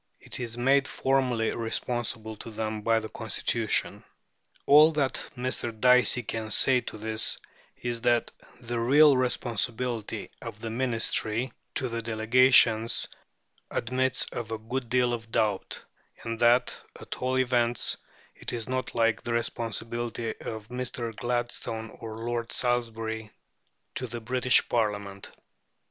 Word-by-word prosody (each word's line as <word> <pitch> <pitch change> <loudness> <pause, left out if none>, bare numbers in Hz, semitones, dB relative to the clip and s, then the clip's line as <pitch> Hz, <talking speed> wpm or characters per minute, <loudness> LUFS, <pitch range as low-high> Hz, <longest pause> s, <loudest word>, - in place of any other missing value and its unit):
It - - -8
is 120 -1 -4
made 135 +3 +3
formally 130 -4 +1
responsible 115 -1 -2
to 115 - -8
them 110 -1 -3
by 115 +1 +3
the 110 - -6
Constitution. 115 0 -1 0.6
All 150 +3 +8
that 140 -3 -1
Mr. 120 -3 -2
Dicey 125 0 +5
can 110 0 -4
say 125 +3 +5
to 110 - -8
this 110 +1 0 0.4
is 120 -1 -3
that 120 0 +2 0.3
"the 120 -1 -3
real 140 +5 +6
responsibility 120 -2 -1
of 105 - -8
the 115 0 -5
Ministry 115 0 0 0.2
to 130 - 0
the 115 -1 -3
Delegations 115 0 +4 0.6
admits 130 +2 +1
of 120 -3 -5
a 110 - -3
good 120 +3 -4
deal 125 0 +2
of 115 -1 -6
doubt," 105 -3 -1 0.4
and 115 -1 -4
that, 120 +1 +3 0.2
at - - -7
all 130 +1 +1
events, 120 -2 +1 0.4
it - - -7
is 115 -2 -4
not 130 0 -3
like 115 -1 +2
the 120 - -3
responsibility 115 0 -3
of 110 -1 -6
Mr. 125 -2 -4
Gladstone 120 -2 -3
or 110 -1 -7
Lord 115 0 -3
Salisbury 115 -3 -1 0.6
to 130 - -3
the 120 +1 -5
British 125 +2 +3
Parliament. 105 -4 -2
120 Hz, 130 wpm, -28 LUFS, 110-125 Hz, 0.6 s, All